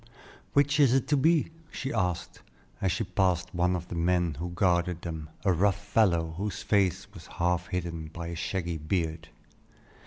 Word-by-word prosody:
"Which 145 Hz, +1 st, +3 dB
is 135 Hz, -3 st, +6 dB
it 135 Hz, 0 st, +1 dB
to 145 Hz, -, +4 dB
be?" 160 Hz, +3 st, +3 dB, 0.2 s
she 135 Hz, +1 st, -4 dB
asked, 90 Hz, -2 st, -2 dB, 0.4 s
as 95 Hz, -, +2 dB
she 105 Hz, +6 st, -1 dB
passed 90 Hz, -4 st, 0 dB
one 90 Hz, +1 st, +2 dB
of 85 Hz, -1 st, -5 dB
the -, -, -5 dB
men 85 Hz, -1 st, +1 dB
who 90 Hz, +1 st, -3 dB
guarded 85 Hz, -1 st, +1 dB
them, 80 Hz, -3 st, -5 dB, 0.2 s
a 95 Hz, -, +4 dB
rough 100 Hz, +3 st, +2 dB
fellow, 95 Hz, -6 st, +2 dB
whose 100 Hz, +1 st, -3 dB
face 100 Hz, -4 st, +2 dB
was -, -, -11 dB
half 90 Hz, 0 st, +1 dB
hidden 85 Hz, -3 st, -3 dB
by 85 Hz, +2 st, -6 dB
a 85 Hz, -, -4 dB
shaggy 85 Hz, -1 st, -2 dB
beard. 80 Hz, 0 st, -2 dB
90 Hz, 175 wpm, -28 LUFS, 85-100 Hz, 0.4 s, is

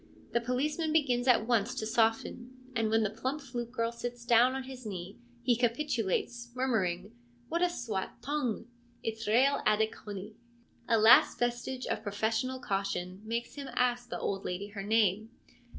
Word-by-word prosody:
The 235 Hz, -, +1 dB
policeman 295 Hz, +6 st, 0 dB
begins 265 Hz, -6 st, +2 dB
at 235 Hz, -3 st, +5 dB
once 235 Hz, 0 st, +1 dB
to 220 Hz, -, -3 dB
soften, 225 Hz, +3 st, 0 dB, 0.2 s
and 225 Hz, -2 st, +1 dB
when 225 Hz, 0 st, +3 dB
the 210 Hz, -, 0 dB
plump 260 Hz, +7 st, -3 dB
flute 240 Hz, -4 st, -5 dB
girl 230 Hz, -2 st, -1 dB
sits 240 Hz, 0 st, -6 dB
down 240 Hz, +2 st, +5 dB
on 265 Hz, -, -3 dB
his 260 Hz, -1 st, -9 dB
knee 195 Hz, -1 st, -6 dB, 0.2 s
he 245 Hz, -1 st, +4 dB
capitulates, 240 Hz, -1 st, -1 dB
murmuring, 205 Hz, -6 st, 0 dB, 0.2 s
' 240 Hz, 0 st, -31 dB
What 335 Hz, +1 st, 0 dB
a 360 Hz, -, +4 dB
swaat 225 Hz, -, -4 dB
toong: 265 Hz, -6 st, -1 dB, 0.4 s
it's 225 Hz, -1 st, -4 dB
reaal 255 Hz, +6 st, +4 dB
Attic 220 Hz, +1 st, +2 dB
hooney! 205 Hz, 0 st, -8 dB, 0.3 s
' -, -, -34 dB
A 230 Hz, -, +4 dB
last 220 Hz, +2 st, +7 dB
vestige 245 Hz, +2 st, -2 dB
of -, -, -2 dB
professional 220 Hz, +5 st, -1 dB
caution 195 Hz, -3 st, -2 dB
makes 230 Hz, +2 st, -3 dB
him 280 Hz, -1 st, -7 dB
ask 245 Hz, -1 st, +1 dB
the -, -, -3 dB
old 195 Hz, -1 st, -2 dB
lady 190 Hz, +3 st, -4 dB
her 200 Hz, -1 st, -6 dB
name. 215 Hz, 0 st, +2 dB
235 Hz, 170 wpm, -31 LUFS, 215-250 Hz, 0.4 s, last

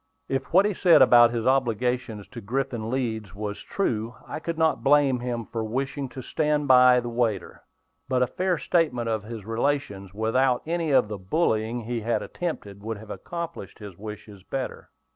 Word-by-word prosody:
If 135 Hz, 0 st, -3 dB
what 190 Hz, +4 st, +6 dB
he 210 Hz, -, +1 dB
said 175 Hz, -6 st, +6 dB
about 120 Hz, -2 st, +7 dB
his 115 Hz, -1 st, -3 dB
obligations 125 Hz, -4 st, 0 dB
to 120 Hz, -, -8 dB
Griffin 120 Hz, 0 st, -2 dB
Leeds 110 Hz, -6 st, -3 dB
was 105 Hz, 0 st, -5 dB
true, 115 Hz, -, -2 dB
I -, -, -5 dB
could 165 Hz, 0 st, -4 dB
not 155 Hz, -7 st, +1 dB
blame 140 Hz, -2 st, +4 dB
him 120 Hz, -2 st, -3 dB
for 115 Hz, +1 st, -4 dB
wishing 135 Hz, +4 st, -3 dB
to 130 Hz, -, -8 dB
stand 150 Hz, 0 st, 0 dB
by 125 Hz, -1 st, +7 dB
the 120 Hz, -, -5 dB
waiter. 115 Hz, -6 st, -2 dB, 0.5 s
But 130 Hz, -1 st, +3 dB
a -, -, +3 dB
fair 180 Hz, +8 st, -1 dB
statement 150 Hz, -10 st, 0 dB
of 110 Hz, -1 st, 0 dB
his 110 Hz, -3 st, -7 dB
relations, 115 Hz, -5 st, -2 dB
without 120 Hz, +5 st, +1 dB
any 165 Hz, 0 st, -1 dB
of 135 Hz, -6 st, +4 dB
the 105 Hz, -1 st, -6 dB
bullying 110 Hz, -, 0 dB
he 115 Hz, +1 st, -3 dB
had 115 Hz, +2 st, 0 dB
attempted, 105 Hz, -, -5 dB
would 110 Hz, +1 st, -4 dB
have 110 Hz, +1 st, -10 dB
accomplished 170 Hz, -, -6 dB
his 105 Hz, -4 st, -10 dB
wishes 105 Hz, 0 st, -9 dB
better. 130 Hz, +7 st, -5 dB
120 Hz, 180 wpm, -25 LUFS, 110-135 Hz, 0.5 s, about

